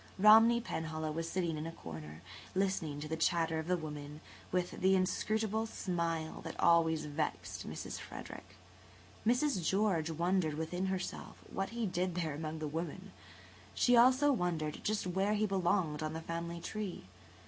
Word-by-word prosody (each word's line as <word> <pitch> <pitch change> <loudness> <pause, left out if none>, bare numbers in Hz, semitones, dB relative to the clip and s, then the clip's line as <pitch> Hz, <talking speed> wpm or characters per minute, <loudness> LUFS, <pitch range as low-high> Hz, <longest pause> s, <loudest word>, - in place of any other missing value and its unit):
Romney 225 +4 +8
Penhallow 160 -8 -3
was 165 +1 -3
sitting 170 -4 -1
in 155 - -4
a - - -5
corner, 80 - -9 0.3
listening 185 -6 0
to 155 - -4
the 160 - -2
chatter 165 0 +1
of 160 - -5
the 180 0 +2
women, 150 -2 -7 0.3
with 180 -1 0
the 190 +1 +5
inscrutable 215 +4 0
smile 170 -6 -2
that - - -7
always 165 -2 +4
vexed 150 +1 -3
Mrs. - - -5
Frederick. 95 0 -9 0.7
Mrs. 245 - +2
George 185 -3 +2
wondered 170 -1 +1
within 175 +4 -2
herself 190 -1 -4 0.2
what 195 0 -1
he 235 0 -2
did 180 -2 -1
there 165 -4 -1
among 155 +1 -4
the 155 -1 -3
women. 170 +5 -5 0.6
She 245 - +4
also 260 +4 +6
wondered 170 - -1
just 215 -2 0
where 190 +3 +1
he 215 +1 +2
belonged 180 -5 +1
on 155 0 -2
the 160 - -4
family 170 +1 -4
tree. 210 +1 -5
170 Hz, 160 wpm, -34 LUFS, 160-195 Hz, 0.7 s, Romney